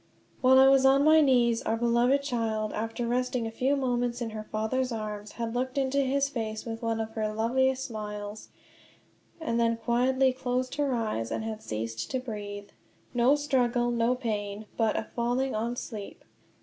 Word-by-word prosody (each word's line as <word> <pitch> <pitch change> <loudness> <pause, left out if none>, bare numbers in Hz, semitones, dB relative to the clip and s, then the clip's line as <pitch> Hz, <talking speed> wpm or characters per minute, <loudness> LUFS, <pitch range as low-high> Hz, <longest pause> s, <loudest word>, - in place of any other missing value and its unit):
While 260 0 +6
I 265 0 +8
was 270 0 +5
on 270 +1 +5
my 310 +1 +6
knees 240 -5 +3
our 225 - -1
beloved 240 +4 +2
child, 225 -5 -1
after 225 +2 -3
resting 250 0 0
a 225 - -4
few 260 +5 +1
moments 245 -3 -1
in 235 -2 -3
her 215 0 -5
father's 235 +5 -1
arms, 210 -2 -5
had 230 -1 -4
looked 255 +2 -2
into 275 +1 +2
his 275 +1 +1
face 220 -5 -4
with 225 -1 -5
one 230 -1 -1
of 220 0 -3
her 215 -1 -2
loveliest 260 +4 +1
smiles, 210 -1 -6 0.9
and 235 -8 -1
then 230 0 +2
quietly 255 +3 +2
closed 255 0 -2
her 280 -3 +1
eyes 215 - -2
and - - -3
had 220 -1 -5
ceased 115 +1 -4
to 260 - -1
breathe. 205 -4 -6 0.4
No 245 +3 +4
struggle, 245 -4 +1
no 235 +1 +2
pain, 210 -3 -3
but 225 -2 +1
a - - -1
"falling 245 +3 0
on 230 +3 -2
sleep." 215 -4 -7
235 Hz, 175 wpm, -28 LUFS, 220-260 Hz, 0.9 s, I